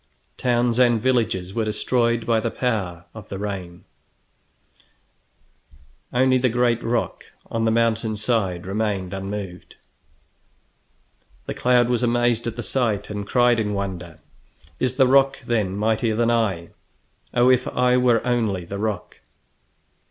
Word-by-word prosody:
Towns 120 -1 +1
and 120 -2 +4
villages 110 -7 0
were 115 0 -1
destroyed 115 +2 0
by 115 -1 +2
the 115 - -1
power 95 -9 -2
of 110 -3 -11
the 95 - -5
rain, 95 -4 -6 2.3
only 130 +1 +3
the 130 0 +2
great 120 0 +1
rock 115 0 -2 0.3
on 115 0 0
the - - +3
mountain 115 -1 +1
side 100 -6 -1
remained 100 -2 -2
unmoved. 95 -2 -6 1.7
The - - -4
cloud 125 -1 +3
was 125 -1 0
amazed 120 -1 +1
at 115 - -3
the 120 - -5
sight, 110 -6 -1
and 100 -1 -5
cried 120 -1 +3
in 105 -2 -1
wonder: 90 -4 -5 0.6
"Is 130 0 0
the 130 - +5
rock, 135 +1 +4
then, 105 -5 0
mightier 110 +1 +1
than 120 +1 +2
I? 100 -8 0 0.7
Oh, 125 +1 +5
if 130 0 +2
I 125 0 +2
were 125 -2 +3
only 110 -7 0
the 100 +3 -6
rock!" 105 -4 -4
115 Hz, 135 wpm, -22 LUFS, 100-120 Hz, 2.3 s, the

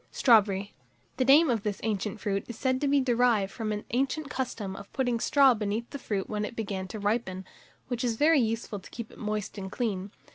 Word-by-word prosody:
STRAWBERRY. 205 -5 +3 0.4
The 255 - +2
name 285 +2 +6
of 225 -3 0
this 205 -1 -3
favourite 215 0 -2
fruit 200 -2 -2
is 235 - -7
said 260 0 0
to 290 - +1
be 280 0 +4
derived 240 -5 +2
from 220 -2 -3
an 210 0 -4
ancient 275 +4 -1
custom 220 -7 -3
of 200 +1 -10
putting 245 -3 0
straw 275 +1 +5
beneath 215 +1 -2
the 280 - -6
fruit 200 -6 -2
when 210 -1 -2
it 210 - -5
began 195 -4 -3
to 215 - -7
ripen, 205 -3 -1 0.4
which 245 -1 -3
is 235 -2 0
very 305 +5 +4
useful 225 -2 -2
to 190 - -14
keep 235 -2 -7
it - - -15
moist 210 -1 -3
and 190 -1 -6
clean. 205 -6 -2
225 Hz, 215 wpm, -28 LUFS, 205-250 Hz, 0.4 s, name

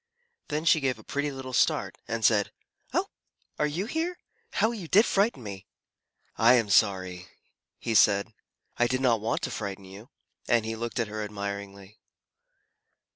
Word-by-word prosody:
Then 150 +2 -2
she 160 - +5
gave 130 -4 0
a 110 - -14
pretty 145 +5 -2
little 130 -1 -7
start, - - +2
and 115 -1 -1
said, 105 -3 +3 0.4
"Oh, - - +1 0.5
are 150 - +3
you 165 +7 -2
here? 330 +8 -2 0.4
How 220 - +2
you 205 -8 -6
did 210 +8 +5
frighten 200 - +1
me!" 100 -3 -8 0.7
"I 115 +2 +7
am 115 -4 +1
sorry," 95 -2 +2 0.5
he 115 - -3
said. 100 0 +4 0.4
"I 120 - +3
did 130 +1 0
not 120 -5 +2
want 110 - -1
to - - -2
frighten 100 -2 -5
you." 100 +6 -12 0.4
And 120 -2 +3
he 110 0 -3
looked 120 +2 -4
at 115 - 0
her 110 0 -4
admiringly. 100 -1 -6
115 Hz, 165 wpm, -27 LUFS, 100-140 Hz, 0.7 s, I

